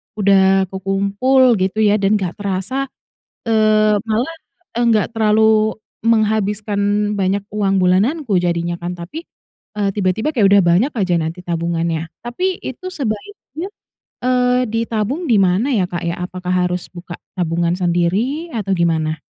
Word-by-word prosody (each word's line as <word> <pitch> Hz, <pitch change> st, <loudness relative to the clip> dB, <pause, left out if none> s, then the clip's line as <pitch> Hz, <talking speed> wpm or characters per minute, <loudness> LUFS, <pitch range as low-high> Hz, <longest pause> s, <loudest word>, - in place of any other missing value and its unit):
udah 195 Hz, -2 st, +4 dB
kekumpul 200 Hz, +7 st, +2 dB
gitu 190 Hz, +4 st, 0 dB
ya 210 Hz, 0 st, +3 dB
dan 200 Hz, +2 st, +2 dB
nggak 185 Hz, -4 st, -2 dB
terasa, 200 Hz, +8 st, -2 dB, 0.6 s
eee, 215 Hz, -1 st, +3 dB
malah, 235 Hz, +9 st, -1 dB, 0.4 s
enggak 230 Hz, -3 st, +3 dB
terlalu 220 Hz, 0 st, +3 dB, 0.3 s
menghabiskan 210 Hz, -2 st, +1 dB
banyak 195 Hz, 0 st, 0 dB
uang 195 Hz, -2 st, +1 dB
bulananku 205 Hz, -, +2 dB
jadinya 170 Hz, 0 st, -1 dB
kan 175 Hz, +1 st, -5 dB
tapi, 195 Hz, -, -7 dB, 0.6 s
eee, 200 Hz, -, +1 dB
tiba-tiba 210 Hz, -, 0 dB
kayak 200 Hz, -4 st, +4 dB
udah 200 Hz, -1 st, +7 dB
banyak 180 Hz, -, +3 dB
aja 185 Hz, -6 st, 0 dB
nanti 165 Hz, +1 st, -2 dB
tabungannya, 165 Hz, -1 st, -2 dB, 0.2 s
tapi 365 Hz, +10 st, -2 dB
itu 370 Hz, +9 st, -6 dB
sebaiknya, 305 Hz, -, -5 dB, 0.5 s
eee, 250 Hz, 0 st, +2 dB
ditabung 230 Hz, -, -2 dB
di 230 Hz, -6 st, +3 dB
mana 200 Hz, +9 st, +2 dB
ya 190 Hz, -4 st, +2 dB
Kak 175 Hz, -, -3 dB
ya? 170 Hz, -, -1 dB
Apakah 180 Hz, 0 st, -3 dB
harus 180 Hz, 0 st, -4 dB
buka 175 Hz, 0 st, -10 dB, 0.2 s
tabungan 170 Hz, -1 st, 0 dB
sendiri 190 Hz, -, 0 dB
atau 205 Hz, -3 st, -3 dB
gimana? 160 Hz, -2 st, 0 dB
205 Hz, 135 wpm, -18 LUFS, 180-230 Hz, 0.6 s, udah